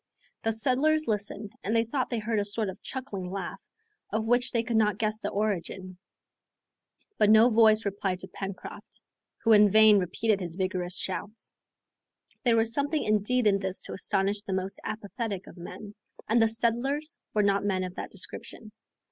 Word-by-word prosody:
The 225 Hz, -, +1 dB
settlers 275 Hz, +7 st, +2 dB
listened 205 Hz, -1 st, -2 dB
and 215 Hz, +4 st, 0 dB
they 225 Hz, -, +4 dB
thought 255 Hz, +3 st, -2 dB
they 240 Hz, -, -1 dB
heard 220 Hz, 0 st, -1 dB
a -, -, +1 dB
sort 205 Hz, 0 st, -2 dB
of 190 Hz, -, -9 dB
chuckling 205 Hz, -9 st, -5 dB
laugh, 190 Hz, -1 st, -5 dB, 0.5 s
of 220 Hz, +1 st, -1 dB
which 245 Hz, +2 st, +2 dB
they 230 Hz, -1 st, +1 dB
could 230 Hz, 0 st, 0 dB
not 210 Hz, -3 st, +2 dB
guess 215 Hz, 0 st, -1 dB
the -, -, -3 dB
origin. 190 Hz, -3 st, -3 dB, 1.2 s
But 210 Hz, -, +5 dB
no 220 Hz, +3 st, +7 dB
voice 220 Hz, -1 st, +5 dB
replied 195 Hz, -2 st, -1 dB
to 190 Hz, -, -8 dB
Pencroft, 195 Hz, 0 st, -7 dB, 0.4 s
who 225 Hz, -, +4 dB
in 210 Hz, -1 st, +7 dB
vain 215 Hz, 0 st, +7 dB
repeated 205 Hz, +3 st, 0 dB
his 175 Hz, -3 st, -5 dB
vigorous 185 Hz, -1 st, -2 dB
shouts. 210 Hz, +3 st, -4 dB, 0.9 s
There 235 Hz, -3 st, +3 dB
was 225 Hz, 0 st, +2 dB
something 285 Hz, +3 st, 0 dB
indeed 215 Hz, +4 st, +1 dB
in 200 Hz, -1 st, +4 dB
this 190 Hz, -1 st, -4 dB
to -, -, -6 dB
astonish 200 Hz, +1 st, 0 dB
the 200 Hz, -2 st, -5 dB
most 190 Hz, +1 st, -3 dB
apathetic 215 Hz, -2 st, -4 dB
of -, -, -13 dB
men, 200 Hz, +4 st, -9 dB, 0.3 s
and 230 Hz, +2 st, +3 dB
the 225 Hz, -, +5 dB
settlers 240 Hz, +7 st, -1 dB, 0.2 s
were 210 Hz, -, +3 dB
not 200 Hz, 0 st, +2 dB
men 190 Hz, -2 st, 0 dB
of 180 Hz, -1 st, -5 dB
that -, -, -6 dB
description. 210 Hz, +2 st, -5 dB
215 Hz, 175 wpm, -28 LUFS, 195-230 Hz, 1.2 s, no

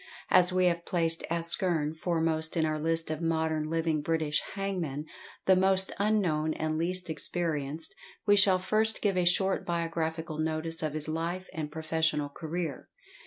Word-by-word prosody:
As 180 Hz, 0 st, +5 dB
we 185 Hz, 0 st, +2 dB
have 170 Hz, -1 st, +1 dB
placed 165 Hz, -2 st, -1 dB
ASKERN 170 Hz, -2 st, +1 dB
foremost 160 Hz, -1 st, 0 dB
in 160 Hz, -, +2 dB
our 155 Hz, 0 st, -1 dB
list 165 Hz, +1 st, -1 dB
of 155 Hz, +1 st, -4 dB
modern 160 Hz, -2 st, 0 dB
living 165 Hz, -2 st, 0 dB
British 155 Hz, -1 st, 0 dB
hangmen, 175 Hz, -8 st, -3 dB, 0.4 s
the 190 Hz, -, +6 dB
most 190 Hz, +1 st, +5 dB
unknown 180 Hz, -7 st, +1 dB
and 155 Hz, 0 st, -2 dB
least 180 Hz, +3 st, -1 dB
experienced, 160 Hz, -2 st, -1 dB, 0.3 s
we 205 Hz, -1 st, +5 dB
shall 195 Hz, -2 st, +5 dB
first 215 Hz, +4 st, 0 dB
give 200 Hz, -3 st, +2 dB
a 180 Hz, -1 st, +1 dB
short 190 Hz, +2 st, +2 dB
biographical 165 Hz, -2 st, -3 dB
notice 160 Hz, +1 st, -1 dB
of 155 Hz, -2 st, -2 dB
his 155 Hz, 0 st, -1 dB
life 170 Hz, +4 st, -3 dB
and 155 Hz, -2 st, -4 dB
professional 160 Hz, -2 st, -1 dB
career. 160 Hz, -1 st, -5 dB
165 Hz, 155 wpm, -29 LUFS, 155-180 Hz, 0.4 s, the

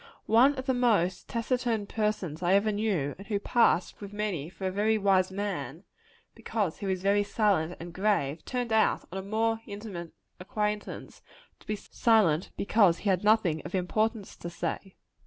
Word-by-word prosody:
One 255 Hz, +6 st, +5 dB
of 260 Hz, -1 st, -5 dB
the 265 Hz, -, +1 dB
most 210 Hz, -8 st, +1 dB
taciturn 230 Hz, -2 st, -1 dB
persons 200 Hz, -7 st, -2 dB
I 180 Hz, +2 st, +3 dB
ever 210 Hz, +2 st, +3 dB
knew, 200 Hz, -10 st, -1 dB
and 195 Hz, -, -10 dB
who 210 Hz, -, 0 dB
passed 210 Hz, -4 st, +2 dB
with 200 Hz, -1 st, -7 dB
many 205 Hz, -8 st, -3 dB
for 180 Hz, +1 st, -7 dB
a 185 Hz, -, 0 dB
very 215 Hz, +3 st, +2 dB
wise 190 Hz, -2 st, +2 dB
man, 200 Hz, +1 st, -4 dB, 0.5 s
because 205 Hz, -8 st, -3 dB
he 200 Hz, -, -4 dB
was 190 Hz, -1 st, -2 dB
very 200 Hz, +1 st, +3 dB
silent 200 Hz, -5 st, +1 dB
and 170 Hz, 0 st, -8 dB
grave, 175 Hz, -7 st, 0 dB
turned 245 Hz, -3 st, -2 dB
out, 220 Hz, 0 st, +2 dB
on 190 Hz, -, -4 dB
a -, -, -4 dB
more 220 Hz, +3 st, 0 dB
intimate 200 Hz, -5 st, -7 dB, 0.3 s
acquaintance, 210 Hz, +2 st, -4 dB, 0.4 s
to -, -, -22 dB
be 215 Hz, -, -1 dB
silent 205 Hz, -6 st, +2 dB
because 200 Hz, -4 st, +3 dB
he 205 Hz, -, -2 dB
had 185 Hz, 0 st, 0 dB
nothing 210 Hz, -7 st, +3 dB
of 175 Hz, -, -5 dB
importance 215 Hz, +3 st, -1 dB
to 170 Hz, -, -6 dB
say. 175 Hz, +3 st, -5 dB
205 Hz, 175 wpm, -28 LUFS, 180-220 Hz, 0.5 s, One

